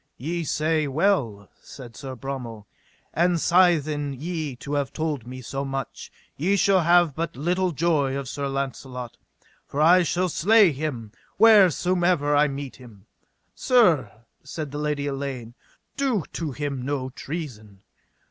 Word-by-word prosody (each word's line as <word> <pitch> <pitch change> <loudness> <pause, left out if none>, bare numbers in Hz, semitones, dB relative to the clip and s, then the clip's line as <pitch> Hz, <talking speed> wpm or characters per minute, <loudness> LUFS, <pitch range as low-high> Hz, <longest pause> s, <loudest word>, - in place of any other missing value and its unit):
Ye 165 +6 -3
say 155 0 0
well, 135 - 0
said 120 -4 -12
Sir 135 0 -7
Bromel, 125 -5 -6 0.5
and 175 +2 +2
sithen 155 -6 +2
ye 155 -4 -4
have 140 -1 -2
told 150 -7 -3
me 130 +1 -8
so 135 +2 -4
much, 135 0 -6 0.2
ye 185 +8 +1
shall 195 0 +3
have 170 -2 +4
but 165 +2 -4
little 180 +6 0
joy 145 -4 0
of 140 -1 -5
Sir 140 +2 -3
Launcelot, 130 -2 -5 0.5
for 140 - -5
I 175 +4 +6
shall 180 +2 0
slay 200 +3 +4
him 130 -7 -5 0.3
wheresomever 180 -7 +4
I 150 +1 +4
meet 140 -1 -6
him. 110 -6 -15 0.5
Sir, 180 - +3 0.3
said 145 +1 -6
the 145 - -5
Lady 150 -1 -2
Elaine, 135 -4 -5 0.4
do 260 - 0
to 160 -3 -3
him 140 -1 -4
no 130 0 -3
treason. 115 - -8
145 Hz, 140 wpm, -24 LUFS, 135-170 Hz, 0.5 s, I